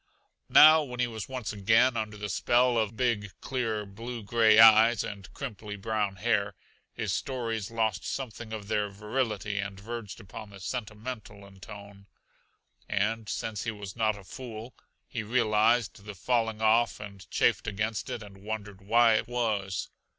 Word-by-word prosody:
Now, 155 +1 +9
when 125 -4 -7
he 125 - +3
was 110 -2 -6
once 125 -5 -4
again 115 +5 +3
under 110 -2 -3
the 105 0 -4
spell 120 +4 +2
of 110 -1 0
big, 110 -6 -1
clear, 115 -5 -2
blue 115 +4 -7
gray 110 0 +4
eyes 110 0 +7
and 100 -2 -8
crimply 110 -6 -6
brown 105 -1 -2
hair, 100 -1 0 0.4
his - - -3
stories 115 -5 -3
lost 110 -4 -1
something 120 -4 -5
of 105 -2 -6
their 105 -1 0
virility 105 -1 -2
and 100 -1 -4
verged 115 0 -7
upon 110 +1 -10
the 100 -1 -12
sentimental 105 -1 -6
in 95 -1 -16
tone. 100 0 -12 0.8
And 105 +2 -1
since 110 -1 -3
he - - 0
was 105 -3 -7
not 110 -2 +1
a 100 - -12
fool 115 +3 -8 0.3
he 115 - -4
realized 110 -1 +2
the 105 -1 -8
falling 115 +1 0
off 115 +2 +3
and 100 -3 -10
chafed - - +2
against 110 +1 -2
it 115 - -4
and 100 -2 -13
wondered 105 -1 -6
why 115 +2 +4
it 110 - -3
was. 110 -6 -2
110 Hz, 160 wpm, -28 LUFS, 100-115 Hz, 0.8 s, Now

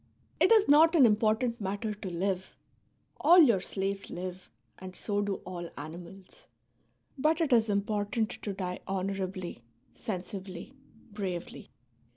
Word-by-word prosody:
It - - +4
is 435 -2 +6
not 315 +4 +6
an 285 -6 +7
important 220 +2 +2
matter 205 +3 -2
to 205 -2 -7
live; 185 +2 -2 0.6
all 350 - +6
your 245 - +7
slaves 195 +1 -3
live, 180 +1 -7 0.3
and 185 0 -9
so 205 -1 -1
do 205 -1 -1
all 175 -2 -6
animals; 175 +5 -10 0.7
but 310 +3 +2
it 310 -6 +2
is 225 -2 +4
important 205 +2 0
to 205 - -5
die 185 -2 -4
honourably, 190 -4 -3 0.3
sensibly, 190 0 -6 0.4
bravely. 185 -4 -5
200 Hz, 130 wpm, -30 LUFS, 185-220 Hz, 0.7 s, an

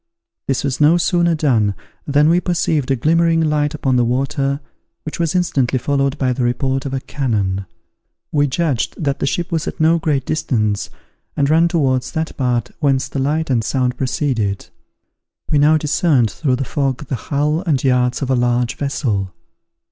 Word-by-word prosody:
This 135 - 0
was 140 0 -2
no 155 +4 +6
sooner 170 -1 +2
done, 115 -10 +1 0.3
than 145 +1 +3
we 170 +2 +3
perceived 160 -6 0
a 135 - +3
glimmering 165 +5 +2
light 150 -1 +1
upon 135 -4 0
the 120 - +3
water 135 +3 -1 0.5
which 155 - -6
was 165 +1 0
instantly 140 -8 +1
followed 140 +2 0
by 130 -3 +1
the 130 - -4
report 130 +3 -1
of 135 - -5
a - - -1
cannon. 100 -9 -2 0.6
We 145 -1 +2
judged 140 -3 -1
that 140 -2 -1
the - - -1
ship 175 +5 -2
was 165 -2 -1
at - - -5
no 165 +2 +4
great 145 -5 0
distance 110 -9 -1 0.5
and 140 - +2
all - - 0
ran 165 +2 +4
towards 130 -7 0
that 160 0 -3
part 125 -4 -1
whence 135 -3 +1
the 140 - -3
light 150 +2 0
and 115 -3 +2
sound 125 +1 0
proceeded. 125 -6 -2 0.8
We 150 - +3
now 155 +2 +5
discerned 145 - +2
through 135 -5 0
the 135 +1 -3
fog 135 +1 -2
the 130 - -3
hull 150 +3 +1
and 140 -5 +1
yards 125 0 +1
of 135 - -1
a - - +3
large 120 0 0
vessel. 105 -10 -2
140 Hz, 180 wpm, -18 LUFS, 125-155 Hz, 0.8 s, no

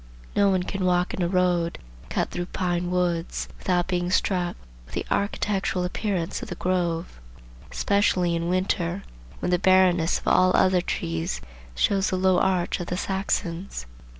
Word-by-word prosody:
No 200 -1 +4
one 185 -2 +2
can 195 +1 -3
walk 180 -1 +2
in - - -3
a 175 - +2
road 175 -2 +1 0.3
cut - - -1
through 175 0 -3
pine 175 -1 -1
woods, 175 -2 -1
without 180 -1 +1
being 175 -1 0
struck 180 -1 +1 0.3
with - - -11
the - - -2
architectural 200 -2 0
appearance 180 -2 -2
of - - -7
the - - -4
grove, 175 - -1 0.5
especially 185 -4 +2
in 170 0 -1
winter, 185 0 0 0.4
when - - 0
the 180 - +3
barrenness 185 -3 +4
of - - -10
all 185 0 +5
other 185 -1 +4
trees 80 - -2 0.4
shows 195 - +2
the 185 - 0
low 185 -1 +3
arch 185 -2 +1
of 175 - -5
the 180 - -2
Saxons. 190 - -2
180 Hz, 160 wpm, -25 LUFS, 175-190 Hz, 0.5 s, all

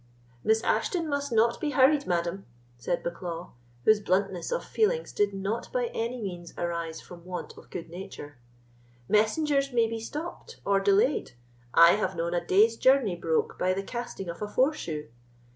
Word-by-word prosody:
"Miss 220 0 +3
Ashton 340 -4 0
must 285 -2 -2
not 230 +1 +3
be 305 - 0
hurried, 280 +2 +5
madam," 175 +2 -1 0.3
said 170 +9 -2
Bucklaw, 170 0 -5 0.3
whose 215 -1 +6
bluntness 190 -2 0
of - - -1
feeling 475 +2 +1
did 205 -1 +2
not 200 +4 -3
by - - -1
any 235 +2 -2
means 175 -5 -6
arise 170 -2 -3
from 175 -1 -12
want 180 0 -6
of - - -15
good 170 -2 -6
nature; 165 -6 -9 0.7
"messengers 275 +6 +2
may 235 -2 +3
be 225 0 -4
stopped 325 - -7
or 200 -1 +3
delayed. 200 - +2 0.4
I 170 0 +9
have 200 -3 -1
known 170 +1 -2
a 175 -1 0
day's 215 +6 +4
journey 260 -8 +4
broke 165 -2 -1
by 185 0 +2
the 195 - -2
casting 235 -4 -5
of 170 +2 -6
a 210 - -2
foreshoe. 210 - 0
200 Hz, 165 wpm, -28 LUFS, 175-255 Hz, 0.7 s, I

